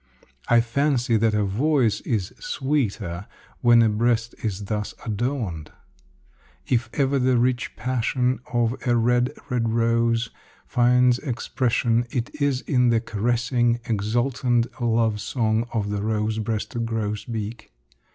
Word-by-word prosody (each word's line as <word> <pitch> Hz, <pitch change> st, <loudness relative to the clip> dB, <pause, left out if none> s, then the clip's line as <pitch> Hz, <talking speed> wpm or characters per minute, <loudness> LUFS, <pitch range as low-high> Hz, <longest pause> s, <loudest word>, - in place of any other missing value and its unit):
I 120 Hz, -1 st, +5 dB
fancy 125 Hz, 0 st, +1 dB
that 110 Hz, 0 st, +2 dB
a 105 Hz, -, +2 dB
voice 120 Hz, +3 st, +1 dB
is 105 Hz, -6 st, -2 dB
sweeter 110 Hz, -, -2 dB, 0.3 s
when 120 Hz, -1 st, +6 dB
a 110 Hz, -, +3 dB
breast 115 Hz, +1 st, +1 dB
is 100 Hz, -2 st, -3 dB
thus 105 Hz, 0 st, -3 dB
adorned. 110 Hz, -, -3 dB, 0.9 s
If 120 Hz, -1 st, 0 dB
ever 140 Hz, -1 st, +1 dB
the 125 Hz, -1 st, +3 dB
rich 125 Hz, 0 st, 0 dB
passion 125 Hz, 0 st, 0 dB
of 120 Hz, -1 st, +1 dB
a 120 Hz, -, +3 dB
red, 120 Hz, +2 st, +2 dB, 0.2 s
red 115 Hz, -2 st, +1 dB
rose 115 Hz, 0 st, +1 dB, 0.3 s
finds 125 Hz, 0 st, +3 dB
expression, 120 Hz, -2 st, 0 dB
it 120 Hz, -2 st, -3 dB
is 140 Hz, -2 st, +1 dB
in 125 Hz, -3 st, +2 dB
the 115 Hz, -1 st, +3 dB
caressing, 120 Hz, +2 st, 0 dB
exultant 120 Hz, +2 st, 0 dB, 0.2 s
love 115 Hz, -2 st, +1 dB
song 110 Hz, 0 st, 0 dB
of 105 Hz, -3 st, -2 dB
the 100 Hz, -1 st, -2 dB
rose 110 Hz, +1 st, -1 dB
breasted 115 Hz, +1 st, -3 dB
grosbeak. 110 Hz, 0 st, -4 dB
115 Hz, 125 wpm, -24 LUFS, 110-125 Hz, 0.9 s, when